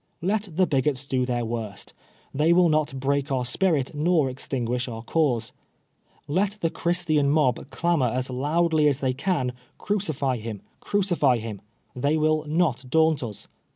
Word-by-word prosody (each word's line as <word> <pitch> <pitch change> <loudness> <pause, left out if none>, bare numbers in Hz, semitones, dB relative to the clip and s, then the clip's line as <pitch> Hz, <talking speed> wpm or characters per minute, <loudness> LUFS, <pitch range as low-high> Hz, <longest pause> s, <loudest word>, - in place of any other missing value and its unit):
Let 205 +2 0
the 185 +2 +4
bigots 140 -2 0
do 130 -2 0
their 120 -2 -1
worst; 110 -3 -5 0.4
the 150 +3 +1
v 170 - +5
will 175 -1 +5
not 155 -3 0
break 140 +1 0
our 130 -2 0
spirit 150 0 +1
nor 155 -2 +2
extinguish 125 -1 -3
our 115 -2 -6
cause. 135 -6 0 0.8
Let 195 +7 0
the 165 - +1
Christian 170 -5 +1
mob 140 -3 +1
clamor 170 -6 +1
as 130 +2 -2
loudly 155 +4 +2
as 140 -2 +1
they 130 -2 0
can, 130 -4 -1
* - - -36
Crucify 155 -11 0
him, 110 -2 -7 0.2
crucify 175 -11 +1
him! 110 -3 -6 0.2
' - - -42
They 150 +2 +3
will 155 0 +2
not 155 -5 +1
daunt 160 0 +3
us. 110 -5 -7
145 Hz, 165 wpm, -25 LUFS, 125-165 Hz, 0.8 s, v